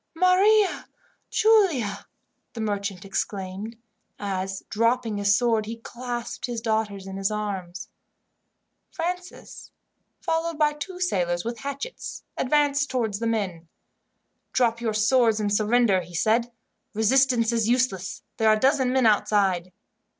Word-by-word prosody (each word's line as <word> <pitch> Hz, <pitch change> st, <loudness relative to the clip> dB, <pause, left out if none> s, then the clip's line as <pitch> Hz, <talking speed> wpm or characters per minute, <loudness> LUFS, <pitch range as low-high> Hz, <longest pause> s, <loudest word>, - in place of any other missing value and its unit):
"Maria 380 Hz, +4 st, +3 dB, 0.4 s
Giulia!" 320 Hz, -, +2 dB, 0.5 s
the 230 Hz, -, -8 dB
merchant 200 Hz, -3 st, -3 dB
exclaimed, 195 Hz, +2 st, -4 dB, 0.4 s
as, 195 Hz, -1 st, -3 dB
dropping 230 Hz, -1 st, 0 dB
his 200 Hz, 0 st, +3 dB
sword, 225 Hz, -2 st, +1 dB
he 225 Hz, +1 st, -5 dB
clasped 240 Hz, +1 st, -5 dB
his 240 Hz, -2 st, -3 dB
daughters 220 Hz, -4 st, -2 dB
in 195 Hz, 0 st, -7 dB
his 195 Hz, 0 st, 0 dB
arms. 195 Hz, -4 st, -4 dB, 1.0 s
Francis, 360 Hz, +1 st, -6 dB, 0.5 s
followed 325 Hz, 0 st, -1 dB
by 300 Hz, -1 st, +3 dB
the 295 Hz, -, -16 dB
two 360 Hz, +4 st, -6 dB
sailors 175 Hz, -, 0 dB
with 235 Hz, 0 st, -4 dB
hatchets, 280 Hz, -, -6 dB
advanced 285 Hz, +1 st, +1 dB
towards 225 Hz, -6 st, -1 dB
the 230 Hz, -, -1 dB
men. 190 Hz, -7 st, -2 dB, 0.9 s
"Drop 235 Hz, -2 st, +2 dB
your 225 Hz, -2 st, -1 dB
swords 225 Hz, 0 st, +3 dB
and 205 Hz, -1 st, 0 dB
surrender," 215 Hz, -2 st, +3 dB
he 175 Hz, 0 st, -11 dB
said. 230 Hz, +7 st, +1 dB, 0.4 s
"Resistance 240 Hz, +1 st, +3 dB
is 230 Hz, -1 st, +1 dB
useless. 215 Hz, -7 st, 0 dB
There 220 Hz, -1 st, +3 dB
are 215 Hz, -, +6 dB
a -, -, -3 dB
dozen 265 Hz, 0 st, +3 dB
men 260 Hz, -1 st, +2 dB
outside." 195 Hz, -4 st, +2 dB
225 Hz, 130 wpm, -25 LUFS, 200-260 Hz, 1.0 s, are